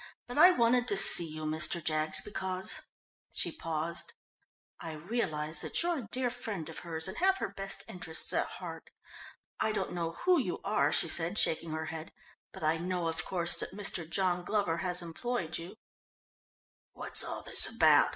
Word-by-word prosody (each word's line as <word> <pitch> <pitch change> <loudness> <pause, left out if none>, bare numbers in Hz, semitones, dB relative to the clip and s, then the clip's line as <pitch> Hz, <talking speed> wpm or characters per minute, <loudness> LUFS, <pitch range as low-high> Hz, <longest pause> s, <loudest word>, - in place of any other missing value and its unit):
But 245 +4 -4
I 360 - +9
wanted 245 -6 +2
to 200 - +3
see 175 -3 +9
you, 155 0 -7
Mr. 160 +3 0
Jaggs, 155 -2 +4
because 190 -2 -1 0.2
" - - -78
she - - 0
paused. 165 - -4 0.7
"I 160 - -7
realise 155 -3 -3
that - - -1
you're 345 -3 0
a 230 - -8
dear 250 0 -1
friend 210 -9 -6
of 160 - -7
hers 165 -1 -5
and 190 - -7
have 380 +2 +3
her - - -3
best 195 0 -5
interests 170 -3 -5
at - - 0
heart. - - -9 0.7
I 220 - +1
don't 215 - -3
know 165 -2 -3
who 365 -2 +5
you 190 -10 -3
are," 155 -8 +1
she 165 - +1
said, 170 +4 +1
shaking 165 -3 +1
her 160 0 -3
head, 160 0 -7 0.4
"but - - -10
I 155 +1 +2
know, 175 0 -2
of 165 - -2
course, 175 -2 -1
that - - -4
Mr. 185 -5 -3
John 180 -1 0
Glover 185 -4 0
has 180 -1 0
employed 175 0 -4
you." 170 +5 -9 1.2
"What's - - +3
all - - -5
this - - +5
about?" - - +4
175 Hz, 180 wpm, -31 LUFS, 160-210 Hz, 1.2 s, I